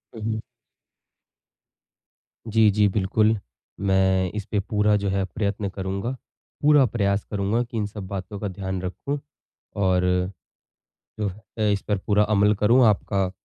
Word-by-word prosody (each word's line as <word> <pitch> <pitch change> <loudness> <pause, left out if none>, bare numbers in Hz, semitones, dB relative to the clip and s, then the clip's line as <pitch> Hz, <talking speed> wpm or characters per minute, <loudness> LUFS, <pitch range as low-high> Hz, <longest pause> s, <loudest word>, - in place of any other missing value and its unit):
हुँ, 110 - -8
हुँ। 110 - -4 2.1
जी, 110 -1 +4
जी, 105 0 +3
बिल्कुल। 105 +3 +2 0.4
मैं 95 -2 +2
इसपे 105 0 -2
पूरा 105 +1 +2
जो 100 -1 -1
है, 95 0 0
प्रयत्न 100 +1 -2
करूँगा, 95 +4 -3 0.5
पूरा 145 -2 +6
प्रयास 100 -3 0
करूँगा 105 +3 0
कि 120 -1 -7
इन 105 - 0
सब 100 -2 -7
बातों 100 +1 -6
का 105 - -3
ध्यान 95 -1 -4
रखूँ 140 +10 -4 0.6
और 95 -2 +2
अ 90 0 -2 1.1
अ, - - -4
इस 105 -2 +2
पर 105 -2 +1
पूरा 105 +2 +2
अमल 105 +1 +4
करूँ। 115 +5 +4
आपका 100 -2 +1
100 Hz, 140 wpm, -24 LUFS, 95-105 Hz, 2.1 s, पूरा